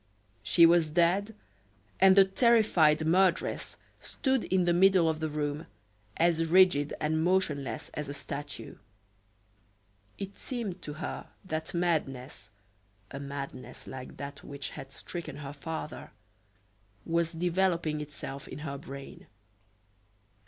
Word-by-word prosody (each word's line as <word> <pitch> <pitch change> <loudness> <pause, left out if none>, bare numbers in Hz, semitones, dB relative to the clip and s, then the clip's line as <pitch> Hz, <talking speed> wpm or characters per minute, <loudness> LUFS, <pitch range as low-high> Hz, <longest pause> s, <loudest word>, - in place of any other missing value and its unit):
She 110 - +6
was 165 -1 +5
dead, 180 +6 +2 0.6
and 190 0 +7
the 195 -1 +8
terrified 190 -8 +4
murderess 180 +2 +2 0.2
stood 265 -3 -1
in 185 -1 +2
the 175 - +3
middle 185 -1 +5
of 160 -1 0
the 160 0 -1
room, 150 0 -3 0.5
as 165 -1 +2
rigid 170 -4 +5
and 160 +1 +1
motionless 165 -6 0
as 150 -2 -5
a - - -4
statue. 140 -4 -7 1.4
It 195 0 -6
seemed 215 -8 -4
to 150 - -5
her 155 - -5 0.2
that 160 0 -4
madness 135 - -1 0.6
a 140 - -6
madness 140 -2 -7
like 130 -1 -8
that 140 0 -7
which 140 -1 -6
had 135 - -9
stricken 160 -1 -7
her 145 -1 -7
father 155 +1 -6 1.0
was 170 0 +1
developing 170 -2 0
itself 145 -1 -7
in - - -8
her 140 -2 -4
brain. 140 -1 -10
160 Hz, 125 wpm, -30 LUFS, 145-180 Hz, 1.4 s, the